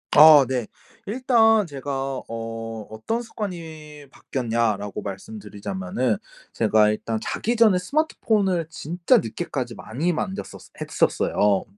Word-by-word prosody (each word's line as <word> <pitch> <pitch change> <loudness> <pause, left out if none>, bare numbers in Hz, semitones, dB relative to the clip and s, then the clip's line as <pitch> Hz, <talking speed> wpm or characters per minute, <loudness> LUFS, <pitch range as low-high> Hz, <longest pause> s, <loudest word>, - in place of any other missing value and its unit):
아. 150 -2 +9
네. 125 -3 -2 0.4
일단 225 -2 +3
제가 135 -2 -4
어 115 -1 -5
"어떤 165 - -3
습관이 160 -9 -7
바뀌었냐."라고 115 -7 -2
말씀드리자면은 100 +2 -3 0.4
제가 105 -1 +3
일단 110 +1 -2
자기 235 +2 -2
전에 220 -5 +5
스마트폰을 195 - 0
진짜 175 - +1
늦게까지 130 - -3
많이 150 +11 -2
만졌었어 190 +4 -5
했었어요. 100 -2 +1
140 Hz, 275 characters per minute, -23 LUFS, 115-185 Hz, 0.4 s, 아